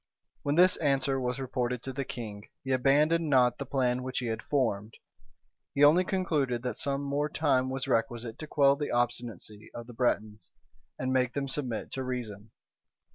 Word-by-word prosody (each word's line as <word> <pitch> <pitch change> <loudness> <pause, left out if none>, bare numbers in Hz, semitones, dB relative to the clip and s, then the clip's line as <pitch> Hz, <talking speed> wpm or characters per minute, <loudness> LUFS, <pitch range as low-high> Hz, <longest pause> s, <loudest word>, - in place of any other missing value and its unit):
When 145 +1 0
this 180 +2 +5
answer 135 -3 +1
was 125 0 -2
reported 125 -2 -2
to 135 - -5
the 140 +1 -2
king, 110 -5 -7
he 135 - -3
abandoned 150 +5 +3
not 125 -3 +4
the 140 - -5
plan 125 -2 +1
which 130 0 -5
he 125 - -1
had 115 -1 -2
formed; 115 -6 -1 0.8
he 140 - +3
only 160 +5 +7
concluded 150 - 0
that 125 - -3
some 140 0 -1
more 145 +2 -1
time 135 -4 +1
was 130 0 -3
requisite 115 0 -1
to 155 - -6
quell 140 -2 +4
the 145 0 -3
obstinacy 120 -3 -3
of 120 - -6
the 120 - -11
Bretons, 110 -5 -1 0.5
and 130 0 -1
make 125 -2 +1
them 140 -1 -1
submit 130 -5 -3
to 130 - -3
reason. 115 -5 -5
130 Hz, 180 wpm, -29 LUFS, 120-140 Hz, 0.8 s, only